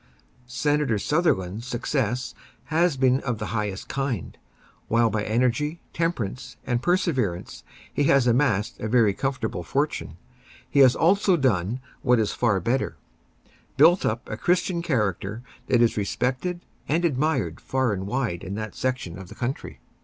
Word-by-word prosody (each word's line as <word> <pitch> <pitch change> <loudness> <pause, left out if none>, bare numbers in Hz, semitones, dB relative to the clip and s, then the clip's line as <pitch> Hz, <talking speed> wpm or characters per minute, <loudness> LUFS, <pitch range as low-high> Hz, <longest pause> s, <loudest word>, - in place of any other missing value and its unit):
Senator 135 -1 +1
Sutherland's 115 - 0
success 125 -1 -1 0.4
has 170 -2 +3
been 130 0 +3
of 125 -5 -2
the 105 +1 -5
highest 105 -3 -3
kind. 135 - -3 0.5
While 115 0 +3
by 105 -2 -1
energy, 125 +8 0
temperance 135 - -2
and 120 -1 0
perseverance 130 - 0 0.3
he 145 - +1
has 140 -2 +4
amassed 120 -4 +1
a 110 - -3
very 110 -3 +4
comfortable 130 -6 -2
fortune, 135 - -2 0.5
he 145 - +1
has 130 -2 +7
also 190 +1 +3
done 120 - 0 0.2
what 125 -1 +4
is 105 -2 +1
far 105 -5 +1
better—built 120 - 0
up 115 +2 -1
a 110 - -5
Christian 175 +3 +1
character 110 - -1 0.2
that 120 -2 +4
is 115 - +2
respected 130 - -1 0.3
and 165 +4 +2
admired 135 - 0
far 130 -4 0
and 95 0 -4
wide 115 -7 -2
in 95 +1 -5
that 110 0 -5
section 125 -9 -3
of 95 - -9
the - - -11
country. 120 - -4
125 Hz, 145 wpm, -25 LUFS, 105-140 Hz, 0.5 s, has